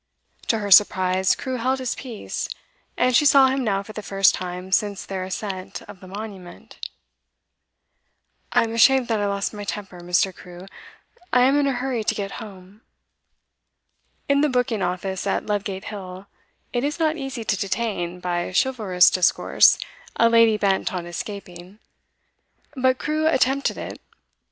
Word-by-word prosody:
To 225 - +2
her 205 -2 -4
surprise, 185 -1 +5
Crewe 260 -2 -4
held 260 +3 0
his 260 -1 -2
peace, 240 -5 -6 0.5
and 250 0 +2
she 295 - +5
saw 275 -2 +6
him 265 0 -1
now 200 -3 0
for 215 - -11
the 215 - -6
first 195 -1 +3
time 180 +1 -6
since 200 0 0
their 190 -1 -4
ascent 185 0 -5
of 205 -2 -13
the 185 - -13
Monument. 195 -2 -10 1.7
'I'm 225 0 +2
ashamed 255 +2 +4
that 225 -2 +1
I 205 - 0
lost 200 +1 -2
my 205 -1 -7
temper, 195 -3 -6
Mr. 180 +2 +1
Crewe. 180 +1 -12 0.7
I 250 - +4
am 265 +3 +4
in 285 - +2
a 275 - +1
hurry 250 -2 -2
to - - 0
get 200 -1 -4
home.' 200 -1 -12 1.5
In 280 0 +3
the 300 - +2
booking 245 -4 0
office 185 +2 -3
at - - -1
Ludgate 200 -2 -3
Hill 190 -2 -8 0.5
it 245 0 0
is 295 +2 -2
not 315 -2 +1
easy 270 -5 -5
to 215 - 0
detain, 195 -4 -3
by 175 0 -2
chivalrous 195 -5 +3
discourse, 185 -2 +4 0.4
a 230 - +4
lady 230 -2 +5
bent 200 +1 0
on 175 -1 -4
escaping; 180 +1 -8 1.0
but 260 -1 +2
Crewe 310 +2 -1
attempted 275 -2 +1
it. - - -7
205 Hz, 155 wpm, -23 LUFS, 185-250 Hz, 1.7 s, saw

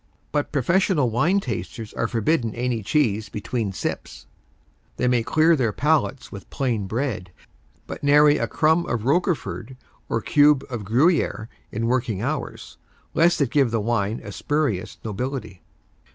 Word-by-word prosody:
But 145 -1 -1
professional 150 - +2
wine 170 - +2
tasters 115 - -5
are 115 - -1
forbidden 115 +1 0
any 120 -1 -1
cheese 110 -2 0
between 110 0 -3
sips. 95 - -5 0.7
They 125 - +1
may 125 -1 +3
clear 160 +7 +3
their 125 -7 +1
palates 145 +1 0
with 100 - -10
plain 115 -7 -1
bread, 110 -5 -3 0.5
but - - -8
nary 145 +1 +5
a 115 - 0
crumb 160 +7 +2
of 115 -2 -2
Roquefort 145 - -1 0.3
or 115 - 0
cube 145 +2 +4
of 115 -5 -4
Gruyère 120 - +1 0.2
in 115 +2 -2
working 120 -4 0
hours, - - -4 0.4
lest 170 -1 +3
it 135 - +1
give 140 -4 +3
the 115 0 0
wine 110 -1 -1
a 100 - -7
spurious 130 -6 -2
nobility. 110 -3 -4
125 Hz, 145 wpm, -23 LUFS, 110-150 Hz, 0.7 s, nary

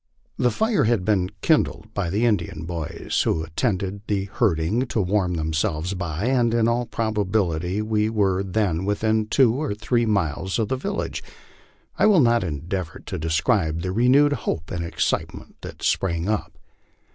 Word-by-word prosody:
The 125 - +3
fire 220 - +1
had 110 -5 +1
been 95 -4 +2
kindled - - +1
by 100 -4 -1
the 105 +7 +1
Indian 85 -8 -1
boys, 80 -3 -2
who 80 - 0
attend 95 +5 -1
to 100 +1 -4
the 100 -2 0
herding, 105 +4 +1
to 115 - -1
warm 95 -2 +1
themselves 80 +2 -1
by, 85 0 -3
and 120 -2 +2
in 115 -1 +3
all 120 +1 0
probability 100 -4 -1
we 110 0 +1
were 100 -4 +1
then 95 -3 0
within 110 +2 0
two 125 -1 +4
or 140 -5 -2
three 120 +2 0
miles 95 -2 0
of 110 -3 -1
the 130 - +1
village. 200 +10 -3 0.8
I - - +5
will 205 -5 +6
not 120 -5 +4
endeavor 85 +2 -4
to - - -5
describe 80 +1 +1
the 90 - -2
renewed 130 +7 +4
hope 80 - -3
and 85 -1 -3
excite 85 - -1
ment - - -13
that - - -9
sprung 85 -1 0
up. 110 -1 -2
100 Hz, 170 wpm, -23 LUFS, 85-115 Hz, 0.8 s, will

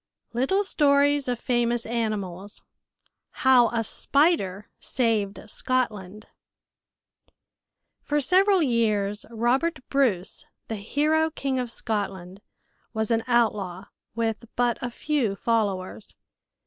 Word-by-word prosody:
LITTLE 270 - +1
STORIES 285 -5 +3
OF 245 -1 -1
FAMOUS 240 -1 0
ANIMALS 205 -4 -4 0.8
How 255 -2 +7
A 230 -1 -1
Spider 215 - +1
Saved 220 -5 0
Scotland 215 -5 -2 1.8
For 295 0 0
several 370 +5 +4
years, 215 -5 0
Robert 250 +9 +1
Bruce, 230 -10 0 0.3
the 220 - -3
hero 305 +9 +1
King 275 -4 -2
of 250 -1 -3
Scotland, 195 -4 -4 0.5
was 220 +1 -1
an 225 -1 +2
outlaw 205 -6 0 0.3
with 225 0 -2
but 240 -1 +1
a 245 - -2
few 245 -5 -1
followers. 205 -3 -2
235 Hz, 100 wpm, -25 LUFS, 205-270 Hz, 1.8 s, How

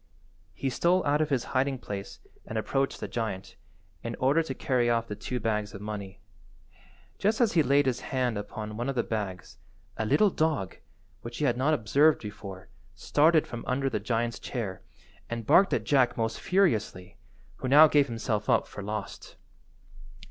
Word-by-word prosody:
He 135 +4 -2
stole 180 +7 +2
out 145 +1 +2
of 155 - 0
his 130 -4 +1
hiding–place 120 -8 -2 0.3
and 110 - -4
approached 135 +5 -1
the - - -4
giant, 110 -5 -4 0.5
in - - -4
order 140 +5 +2
to 135 -5 -5
carry 125 -3 +1
off 115 -1 +1
the 105 - -5
two 125 +4 -4
bags 105 -2 -2
of - - -7
money. 100 -2 -6 1.0
Just 215 +2 +1
as 235 -4 +3
he 165 - +5
laid 140 +1 +3
his 125 -2 0
hand 125 -3 -1
upon 105 +1 -6
one 120 +3 -2
of 135 - -2
the 120 - +1
bags 100 -5 -5 0.4
a 110 - -1
little 185 - +4
dog, 155 - -1 0.4
which 120 0 -8
he 150 - 0
had 120 -3 +2
not 140 +5 +2
observed 145 +7 +3
before, 100 -3 -8 0.3
started 155 +1 +3
from 120 -1 -7
under 135 +1 0
the - - -1
giant's 115 +2 -1
chair 105 -7 -5 0.5
and 115 -1 -4
barked 195 - +5
at - - 0
Jack 130 -4 +2
most 115 -1 -1
furiously, 110 - 0 0.4
who 130 - -4
now 150 +4 +8
gave 145 -2 +3
himself 115 -3 -2
up - - +3
for - - -9
lost. 105 0 -6
120 Hz, 175 wpm, -28 LUFS, 105-145 Hz, 1.0 s, now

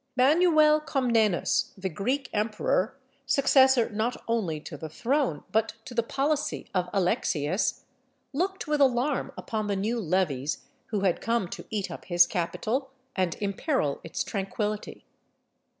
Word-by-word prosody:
] 255 - -41
Manuel 305 +2 +5
Comnenus, 235 - +1
the 190 0 -3
Greek 255 - -1
emperor, 215 +2 0 0.3
successor 265 -3 +5
not 220 +4 -1
only 205 -10 0
to 155 - -8
the 155 +2 -7
throne 245 - 0
but 220 +1 +1
to 255 - -8
the 235 - +2
policy 280 +5 -1
of 180 -2 0
Alexius, 175 -2 0 0.5
looked 380 +6 -1
with 300 -2 0
alarm 265 +1 +2
upon 215 -2 -3
the 200 - 0
new 220 +5 -1
levies 155 - 0 0.2
who 210 -3 -2
had 190 -3 +1
come 230 -5 0
to - - -7
eat 205 -3 -2
up - - -8
his 175 -1 +5
capital 220 +10 -2 0.3
and 185 -3 0
imperil 200 - -1
its 165 - -3
tranquillity. 205 +1 -3
220 Hz, 140 wpm, -27 LUFS, 190-265 Hz, 0.5 s, Manuel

